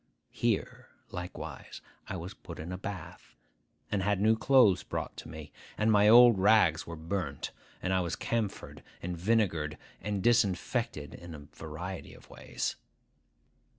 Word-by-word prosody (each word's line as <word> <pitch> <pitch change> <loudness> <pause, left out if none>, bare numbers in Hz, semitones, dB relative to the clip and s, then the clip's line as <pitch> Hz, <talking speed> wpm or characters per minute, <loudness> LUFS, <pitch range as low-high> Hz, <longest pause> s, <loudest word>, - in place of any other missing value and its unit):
Here, - - -1 0.2
likewise, 90 +1 -7 0.3
I 95 - -4
was 90 +4 -7
put - - -10
in 80 +3 -6
a 90 - -4
bath, 100 -1 -8 0.6
and 100 - +1
had 100 0 +1
new 110 +2 +4
clothes 115 -5 +5
brought - - -4
to - - -8
me; 75 -1 -9 0.3
and 110 +1 +3
my 105 -1 +5
old 120 -2 +8
rags 95 -6 +4
were 85 - -5
burnt, 80 -2 -3 0.3
and 95 - 0
I 95 - +3
was 85 -2 -2
camphored 115 -4 -3 0.2
and 90 +1 -3
vinegared 85 -6 +1 0.2
and 100 -2 -2
disinfected 115 - +1
in 85 -2 -9
a - - -9 0.2
variety - - -7
of - - -17
ways. - - -4
95 Hz, 150 wpm, -30 LUFS, 85-110 Hz, 0.6 s, old